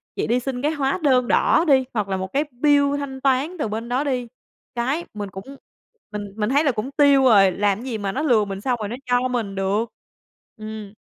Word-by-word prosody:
Chị - - -2
đi 240 +2 +2
xin 250 0 -4
cái 295 +3 +1
hóa 280 0 -1
đơn 255 -4 +3
đỏ 320 - +3
đi, 265 -3 +4
hoặc 210 -4 -1
là 190 - -1
một 190 0 -6
cái 285 - +2
bill 285 +2 +2
thanh 270 -2 -6
toán 275 +6 +1
từ 290 - -1
bên 220 +3 -5
đó 255 +3 0
đi." 255 -4 -2 0.5
Cái 265 +8 -1
mình 205 -2 -5
cũng 195 +9 -10 0.6
mình 205 -2 -6
mình 210 0 0
thấy 285 +4 +3
là 285 - +3
cũng 245 +3 -4
tiêu 280 -2 +4
rồi, 200 -7 +6
làm 200 +1 +1
cái 245 - -9
gì 245 -4 -3
mà 200 -2 -3
nó 270 - -3
lừa 235 -8 +3
mình 195 -1 -6
xong 250 +1 0
rồi 210 -2 -4
nó 235 - -4
cho 250 0 +1
mình 230 -6 -3
được. 195 +3 0 0.7
Ừm. 215 -2 -8
245 Hz, 235 wpm, -22 LUFS, 210-275 Hz, 0.7 s, rồi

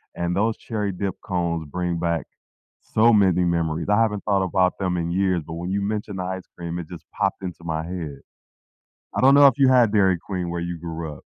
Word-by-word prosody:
And 85 0 -1
those 110 +3 +1
cherry-dip 100 -3 -3
cones 85 -3 -1
bring 90 -1 -1
back 85 -3 -1 0.7
so 115 +2 +6
many 95 -4 +4
memories, 85 -2 -1
I 105 +2 +4
haven't 105 -3 0
thought 100 -2 +2
about 95 0 +2
them 90 -2 -1
in 85 0 -2
years, 90 -2 +1
but 80 - -7
when 90 +1 -4
you 100 +1 0
mentioned 105 0 -3
the - - -2
ice 95 0 -5
cream, 85 0 -4
it 85 - -7
just 90 -2 -10
popped - - -1
into 90 -2 -6
my 80 -1 -2
head. 85 -6 -6 1.0
I - - 0
don't 135 +2 +7
know 140 0 +9
if 135 - +3
you 135 -2 +5
had 125 -4 +5
Dairy 95 -4 +4
Queen 90 -2 -4
where 85 0 -3
you 85 0 -4
grew 80 -1 -6
up. 75 - -14
90 Hz, 215 wpm, -23 LUFS, 85-100 Hz, 1.0 s, know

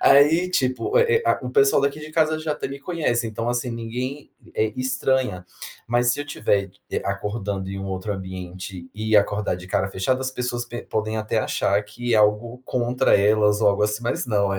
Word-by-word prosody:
Aí 155 +6 +5
,tipo, 130 - +1
eh, 465 -1 +3
a - - +3
o - - -4
pessoal 420 -1 +4
daqui 140 +1 0
de 155 0 -8
casa 155 0 +2
já 155 -1 -2
até - - -4
me 140 +1 -7
conhece 140 -8 -1
então, 115 +1 -3
assim, 120 +1 -1
ninguém, 125 +5 -5 0.2
eh, 110 0 +1
estranha, 130 -6 0 0.4
mas 120 +1 +3
se 145 - -3
eu 145 - -5
estiver 100 -7 0 0.2
de - - 0
acordando 100 -1 -3
em 95 - -5
um 95 - -5
outro 95 +2 -3
ambiente 95 -1 -7
e 110 0 +2
acordar 105 -2 +1
de 90 +1 -10
cara 95 +1 0
fechada 100 +7 0
as 130 0 -2
pessoas 125 -2 -3
pe 120 0 -6
podem 110 0 -2
até 110 +1 -1
achar 105 -1 +1
que 120 +3 -4
é - - +5
algo 105 +4 +2
contra 125 +1 +2
elas 105 +1 +3
ou - - +6
algo 100 +1 +2
assim 105 +2 0
mas, 120 - -1
não 100 -4 +1
é, 95 - -1
115 Hz, 205 wpm, -23 LUFS, 100-130 Hz, 0.4 s, ou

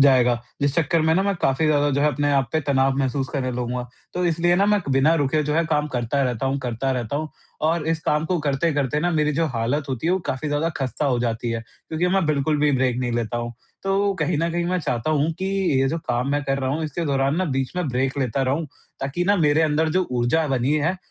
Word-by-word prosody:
जाएगा, 130 -3 +5 0.3
जिस 145 -1 +1
चक्कर 170 0 +2
में 160 0 +3
ना 190 - +3
मैं 200 0 +1
काफ़ी 135 0 +1
ज़्यादा 145 -1 +3
जो - - +2
है 150 - +3
अपने 145 +1 0
आप 135 -2 +2
पे 160 - +2
तनाव 135 0 +2
महसूस 135 0 -1
करने 130 -2 -2
लगूँगा। 125 0 -2 0.3
तो 180 0 0
इसलिए 170 +1 +2
ना 200 +1 +3
मैं 210 0 +4
बिना 135 +5 +4
रुके 150 0 +1
जो 150 +1 -1
है 165 +1 +2
काम 150 0 +2
करता 125 +3 0
रहता 125 0 -1
हूँ, 135 +1 0
करता 125 0 -2
रहता 125 +1 -2
हूँ 155 +1 -3 0.3
और 160 0 +1
इस 165 0 0
काम 150 +1 +1
को 180 0 0
करते-करते 145 0 0
ना 175 +3 +1
मेरी 150 -2 +1
जो 165 +3 +1
हालत 130 +2 -1
होती 130 +4 -3
है 180 - +3
वो 190 - +2
काफ़ी 140 +3 -2
ज़्यादा 145 +3 0
खस्ता 135 +2 -2
हो 125 -3 +1
जाती 120 0 -1
है। 115 0 -2 0.3
क्योंकि 165 +3 0
मैं 195 -3 +3
बिल्कुल 150 0 +1
भी 150 -1 +3
ब्रेक 125 -2 +1
नहीं 120 -1 -1
लेता 120 -1 -2
हूँ। 120 0 -3 0.3
तो 195 +1 +1
कहीं 150 0 0
न 165 +1 0
कहीं 175 0 -1
मैं 180 +1 0
चाहता 125 +1 -1
हूँ 155 +1 +2
कि 190 - -2 0.3
ये 135 - +2
जो 165 +3 -1
काम 125 +2 0
मैं 145 0 0
कर 135 0 0
रहा 130 -1 -1
हूँ 155 +3 -1
इसके 155 +3 -3
दौरान 140 +1 +1
ना 185 - +1
बीच 135 -4 -2
में 180 - 0
ब्रेक 130 +2 -1
लेता 135 0 0
रहूँ, 140 +5 0 0.3
ताकि 140 +6 -2
ना 200 +2 +3
मेरे 155 -2 +3
अंदर 155 +1 +2
जो 185 - 0
ऊर्जा 125 +6 +1
बनी 130 +1 +1
है 185 +3 0
145 Hz, 255 wpm, -23 LUFS, 130-160 Hz, 0.3 s, जाएगा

